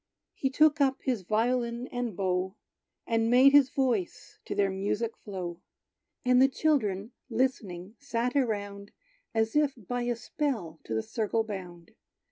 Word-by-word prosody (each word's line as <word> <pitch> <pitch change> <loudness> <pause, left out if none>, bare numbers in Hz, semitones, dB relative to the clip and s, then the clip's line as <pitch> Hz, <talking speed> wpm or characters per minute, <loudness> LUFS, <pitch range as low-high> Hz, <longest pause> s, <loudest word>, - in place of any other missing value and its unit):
He 265 - -1
took 305 +2 +4
up 270 -1 +3
his 250 -6 0
violin 235 +4 0
and 245 -6 -3
bow, 185 0 -1 0.5
And 225 0 +1
made 255 +3 +7
his 280 -2 +6
voice 240 -9 -2
to - - -4
their 200 -1 +2
music 205 +4 -2
flow; 180 -4 -6 0.6
And 250 0 +5
the 265 - +7
children, 240 -8 0 0.2
listening 220 -6 -2
sat 250 -2 -2
around 205 -6 -2 0.4
As 220 +2 +1
if 295 -2 +3
by 245 +3 -4
a 240 0 0
spell 225 - -3
to 110 - -3
the 110 - 0
circle 225 0 -1
bound. 180 -5 -8
230 Hz, 145 wpm, -29 LUFS, 195-255 Hz, 0.6 s, made